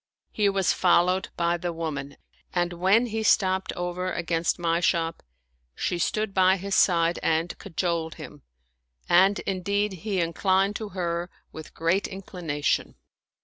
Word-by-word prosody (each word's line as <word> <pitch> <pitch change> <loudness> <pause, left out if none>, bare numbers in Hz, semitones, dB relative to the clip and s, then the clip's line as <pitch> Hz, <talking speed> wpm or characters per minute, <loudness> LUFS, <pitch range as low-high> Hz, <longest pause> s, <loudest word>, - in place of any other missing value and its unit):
He 205 -2 +2
was 195 -2 +1
fol 175 -1 +4
lowed 185 +1 -1
by 170 0 +1
the 175 0 -3
woman, 150 -4 -5 0.4
and 175 0 0
when 190 +7 +3
he 225 -1 -3
stopped 190 -3 +2
over 180 +1 -3
against 170 0 -1
my 170 -1 +1
shop, 165 -1 0 0.5
she 175 - -2
stood 215 +2 -1
by 190 0 +4
his 195 +1 -5
side 170 -2 +3
and 165 +2 0
cajoled 170 -3 -2
him, 150 - -10 0.7
and 190 +3 +5
indeed 200 +2 -1
he 200 -3 -1
inclined 190 +4 +1
to 215 -2 -6
her 170 0 -2 0.2
with 160 - -10
great 170 +4 +1
inclination. 175 -6 -3
180 Hz, 145 wpm, -26 LUFS, 170-195 Hz, 0.7 s, and